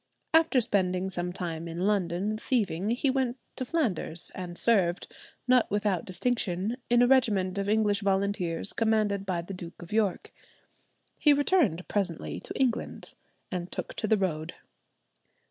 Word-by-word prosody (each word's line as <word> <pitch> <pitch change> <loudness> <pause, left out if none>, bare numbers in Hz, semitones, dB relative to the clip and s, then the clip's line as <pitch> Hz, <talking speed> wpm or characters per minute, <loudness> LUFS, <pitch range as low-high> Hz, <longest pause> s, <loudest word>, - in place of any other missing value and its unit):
After 320 -5 +5
spending 190 -4 0
some 175 -1 -2
time 170 -2 -4
in 165 +1 -5
London 200 0 0
thieving, 210 -5 0
he 250 +3 +1
went 260 -2 0 0.2
to 260 - -3
Flanders 235 - -2
and 175 -2 -6
served, 190 -6 +2 0.4
not 250 -2 +4
without 205 -4 0
distinction, 205 +1 -1
in 240 0 +5
a - - +5
regiment 205 -8 +2
of 200 0 -1
English 210 -1 +2
volunteers 195 -3 0
commanded 215 -3 +1
by 175 -3 -1
the 195 - -7
Duke 175 -2 -9
of 175 +2 -9
York. 210 -4 0 0.9
He 295 - +6
returned 285 - +2
presently 190 -6 -2
to - - -7
England, 255 -4 -1 0.4
and 180 -1 -4
took - - -4
to 215 - -1
the 220 - +4
road. 160 -5 -2
200 Hz, 145 wpm, -28 LUFS, 180-235 Hz, 0.9 s, He